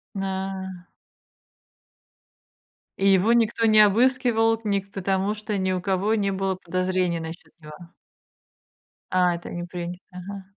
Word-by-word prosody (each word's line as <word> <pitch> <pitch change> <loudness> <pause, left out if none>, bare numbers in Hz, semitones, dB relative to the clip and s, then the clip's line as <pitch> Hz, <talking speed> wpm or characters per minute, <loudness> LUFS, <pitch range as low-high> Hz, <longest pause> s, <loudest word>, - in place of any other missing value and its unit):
М, 195 - -3
а. 190 -1 -4 2.1
И 195 - +3
его 195 +4 +4
никто 230 -1 +2
не 215 -1 +6
обыскивал, 225 +1 +3
ник 200 -1 -1
потому 195 +2 0
что 210 -1 -4
ни 190 -1 0
у 185 - -1
кого 195 +3 0
не 200 -2 0
было 190 -1 -1
подозрений 185 -1 -1
насчёт 160 0 -9
него. 155 +3 -12 1.2
А, 180 -1 +3
это 170 - -7
не 175 0 -5
принято. 175 0 -6
Ага. 190 +2 -8
190 Hz, 130 wpm, -24 LUFS, 180-210 Hz, 2.1 s, не